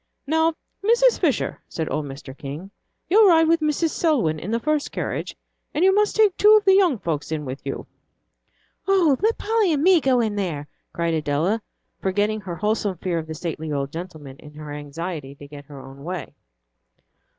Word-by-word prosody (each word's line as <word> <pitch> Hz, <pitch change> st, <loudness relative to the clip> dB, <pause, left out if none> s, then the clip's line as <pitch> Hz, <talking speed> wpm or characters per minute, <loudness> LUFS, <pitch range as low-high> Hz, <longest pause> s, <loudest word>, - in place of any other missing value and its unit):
"Now, 320 Hz, +2 st, +2 dB, 0.3 s
Mrs. 475 Hz, +3 st, +4 dB
Fisher," 295 Hz, -, 0 dB
said 160 Hz, -2 st, -3 dB
old 150 Hz, -, -1 dB
Mr. 135 Hz, -1 st, -9 dB
King, 150 Hz, +7 st, -8 dB, 0.4 s
"you'll 410 Hz, +3 st, +6 dB
ride 325 Hz, -2 st, +5 dB
with 330 Hz, +1 st, +3 dB
Mrs. 310 Hz, +1 st, +1 dB
Selwyn 230 Hz, -, +1 dB
in 175 Hz, -, -6 dB
the 230 Hz, +1 st, 0 dB
first 305 Hz, +3 st, -1 dB
carriage, -, -, -4 dB, 0.4 s
and 335 Hz, -, +3 dB
you 385 Hz, -, +5 dB
must 420 Hz, +1 st, +2 dB
take 420 Hz, -4 st, +4 dB
two 425 Hz, +1 st, +7 dB
of 420 Hz, -, -1 dB
the 385 Hz, -, +6 dB
young 370 Hz, -9 st, +4 dB
folks 160 Hz, -6 st, -3 dB
in 155 Hz, -2 st, -3 dB
with 130 Hz, +1 st, -6 dB
you." 135 Hz, -, -5 dB, 1.0 s
"Oh, 365 Hz, -8 st, +4 dB
let 445 Hz, +2 st, +2 dB
Polly 435 Hz, -4 st, +1 dB
and 295 Hz, -2 st, +1 dB
me 365 Hz, -2 st, +5 dB
go 260 Hz, -2 st, +3 dB
in 220 Hz, -3 st, 0 dB
there!" 160 Hz, -7 st, -3 dB, 0.2 s
cried 170 Hz, -1 st, -1 dB
Adela, 160 Hz, +8 st, 0 dB, 0.4 s
forgetting 205 Hz, +3 st, 0 dB
her 180 Hz, -3 st, -6 dB
wholesome 210 Hz, -1 st, -1 dB
fear 170 Hz, 0 st, -2 dB
of 160 Hz, -, -7 dB
the 160 Hz, -, -6 dB
stately 160 Hz, -1 st, -5 dB
old 140 Hz, -1 st, -2 dB
gentleman 160 Hz, -6 st, -8 dB
in 150 Hz, +1 st, -14 dB
her 150 Hz, -1 st, -8 dB
anxiety 145 Hz, 0 st, -6 dB
to 145 Hz, 0 st, -12 dB
get 145 Hz, 0 st, -11 dB
her 140 Hz, -1 st, -11 dB
own 135 Hz, +1 st, -12 dB
way. 175 Hz, 0 st, -5 dB
190 Hz, 190 wpm, -23 LUFS, -, 1.0 s, two